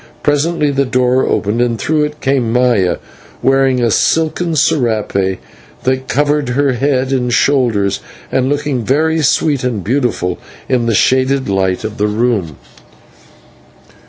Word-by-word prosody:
Presently 150 +1 +1
the 140 0 +1
door 125 0 +1
opened, 110 +3 0
and 120 -2 0
through 150 +4 0
it 150 0 -8
came 130 -4 0
Maya, 120 -7 +2 0.5
wearing 135 -2 +2
a 115 - +2
silken 165 - +1
/serape/ 110 - 0 0.5
that 130 0 -1
covered 145 -1 0
her 135 +2 +1
head 135 +1 0
and 125 -2 0
shoulders, 115 -8 +1 0.3
and 130 0 +1
looking 145 -4 -1
very 160 +6 +1
sweet 145 -1 +1
and 115 -6 -2
beautiful 115 -7 -1 0.3
in 125 -3 0
the 115 - +1
shaded 130 +4 +2
light 95 -2 0
of 110 0 -5
the 105 - +2
room. 105 - -1
130 Hz, 135 wpm, -15 LUFS, 115-145 Hz, 0.5 s, Maya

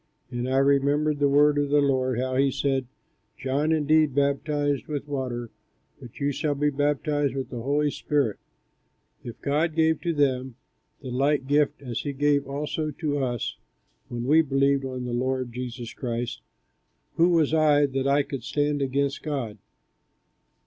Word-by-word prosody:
And 120 +1 -3
I 130 - +1
remembered 140 +2 +2
the 145 -1 +3
word 145 +1 +4
of 145 -1 0
the 145 +1 +4
Lord, 130 -3 +1
how 130 0 -1
he 135 +1 +3
said, 135 -1 -1 0.5
'John 140 +4 0
indeed 155 -2 +3
baptized 145 0 0
with 145 -1 -4
water, 125 -4 -4 0.5
but 120 - -12
you 145 0 +1
shall 145 +1 -1
be 145 +1 +1
baptized 145 0 0
with 135 -1 -3
the 120 - -5
Holy 145 +3 +1
Spirit.' 140 -9 -1 0.8
If 120 - -8
then 140 - -2
God 155 +2 +1
gave 160 -1 +2
to 170 - 0
them 130 -4 0 0.5
the 130 -2 -7
like 135 +2 +1
gift 145 +1 +1
as 120 -3 -4
he 145 - -3
gave 145 0 +1
also 150 +2 -3
to 145 0 -2
us, 125 -3 -2 0.5
when 120 0 -5
we 155 +5 +5
believed 140 -1 +1
on 130 -1 -4
the 120 - -4
Lord 130 0 -1
Jesus 125 -1 -6
Christ, 120 -2 -4 0.8
who 170 +2 +5
was 160 -3 +2
I, 150 -2 +4
that 135 -1 -1
I 140 +1 +3
could 135 -4 -6
stand 145 +2 0
against 140 +1 0
God?" 130 -9 -4
140 Hz, 165 wpm, -26 LUFS, 130-145 Hz, 0.8 s, we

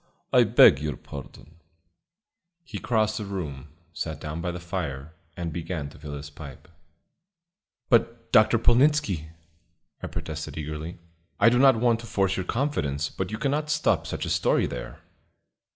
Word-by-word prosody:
I 125 -1 +6
beg 105 - +7
your 75 0 -3
pardon." 75 +3 -11 1.1
He 120 -9 -7
crossed 110 -2 +1
the 105 - -4
room, 80 -9 -5 0.3
sat 75 -1 -4
down 75 +2 -5
by 90 - -2
the 90 0 -4
fire, 80 -5 -5 0.2
and 85 -3 -4
began 80 -3 -4
to - - -15
fill 75 -1 -7
his 70 +1 -8
pipe. 75 -3 -11 1.2
"But, 115 -1 +1
Dr. 110 +2 +6
Polnitzski," 120 - +3 0.7
I - - -4
protested - - -6
eagerly, 75 +2 -5 0.4
"I 115 - +7
do 125 +1 +2
not 135 -1 +7
want 115 0 +2
to 115 - -9
force 95 -2 +1
your 95 - -3
confidence, 75 - -1
but 95 - -4
you 110 - -4
cannot 145 +5 -1
stop 105 - +1
such - - -3
a - - -3
story - - +2
there." 60 - -7
90 Hz, 155 wpm, -26 LUFS, 75-115 Hz, 1.2 s, beg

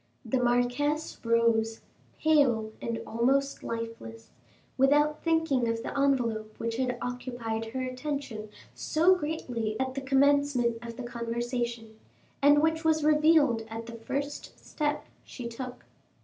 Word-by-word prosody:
The 255 +3 0
marquise 245 +6 0
rose, 230 -1 +2 0.4
pale 260 -9 +3
and 230 -1 -3
almost 270 +5 +1
lifeless, 230 - -6 0.4
without 295 +3 +3
thinking 320 -7 +2
of 230 0 -1
the - - -5
envelope, 235 -6 0
which 230 0 -3
had 250 -1 -1
occupied 245 -3 -4
her 255 +4 -4
attention 255 -4 -4 0.2
so 335 +4 +3
greatly 250 -10 -3
at 260 0 -1
the 275 - -4
commencement 270 -3 +2
of 235 0 -8
the 255 - -5
conversation, 235 -1 -4 0.4
and 290 +1 +6
which 320 0 +1
was 315 -1 +2
revealed 300 -5 +4
at 225 +1 -6
the 235 - -9
first 280 +5 -5
step 295 -1 -2 0.2
she 245 -2 -7
took. 250 +2 -7
250 Hz, 130 wpm, -29 LUFS, 230-285 Hz, 0.4 s, and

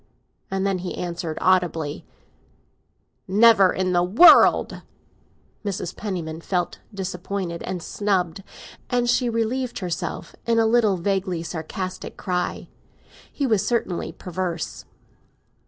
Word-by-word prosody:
And 195 0 -1
then 195 -2 0
he 180 0 -5
answered 170 -2 -4
audibly: 175 -5 +1 1.2
"Never 200 -1 +6
in 185 -1 -1
the 175 - +3
world!" 205 - +6 0.8
Mrs. 185 -3 -4
Penniman 170 -6 -5
felt 175 -1 -2
disappointed 190 -2 -4
and 180 -2 -4
snubbed, 190 -4 -1 0.5
and 245 -1 +1
she 245 0 +2
relieved 235 +2 -1
herself 175 -2 -4
in 230 0 +2
a 225 - +4
little 220 -4 +3
vaguely 185 -2 -1
sarcastic 180 +3 -6
cry. 180 -1 -2 0.6
He 285 - -2
was 220 -6 +2
certainly 230 -7 -1
perverse. 180 -2 -5
185 Hz, 110 wpm, -23 LUFS, 175-210 Hz, 1.2 s, Never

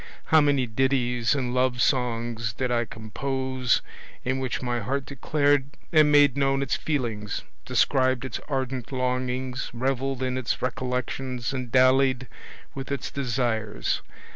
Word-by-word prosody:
how 160 - +8
many 140 -3 +3
ditties 125 0 +1
and 125 -3 -1
love 125 -1 +1
songs 120 -3 0
did 125 +1 -2
I 120 -1 +1
compose 130 +3 -1 0.4
in 130 +1 0
which 130 -2 -2
my 120 -1 -1
heart 130 +5 -2
declared 145 0 +1 0.2
and 155 -2 +6
made 145 -3 +6
known 135 -1 +2
its 135 - 0
feelings, 115 -9 -2 0.2
described 130 -1 +2
its 130 - -4
ardent 130 -3 -2
longings, 125 0 -2
revelled 130 +1 -1
in 130 0 -1
its 120 - -1
recollections 125 0 -2
and 130 -3 -4
dallied 130 0 +4 0.5
with 135 0 -6
its 140 - -3
desires! 120 -5 -1
130 Hz, 135 wpm, -26 LUFS, 120-135 Hz, 0.5 s, how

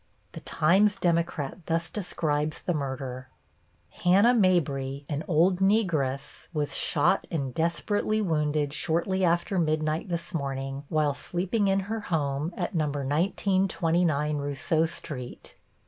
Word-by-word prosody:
The - - -8
Times 195 +6 +3
Democrat 170 -5 -1
thus 165 0 0
describes, 155 -6 -1
the 180 - 0
murder: 130 -3 -4 0.6
Hannah 200 +7 +4
Mabry, 145 - +1
an 150 0 -3
old 175 +2 +3
Negress, 160 -10 0
was 150 -1 -1
shot - - +2
and 135 -6 -3
desperately 205 - 0
wounded 150 -6 0
shortly 175 +5 0
after 175 +2 +1
midnight 155 +2 0
this 170 +1 -3
morning 135 -2 -3
while 150 -2 +2
sleeping 185 +8 -1
in 195 0 +2
her 220 +4 -3
home 150 -4 -1
at 175 - -2
No. 160 -3 +1
1929 160 +1 +1
Rousseau 145 +3 0
Street. 130 -6 -8
160 Hz, 120 wpm, -27 LUFS, 145-185 Hz, 0.6 s, Hannah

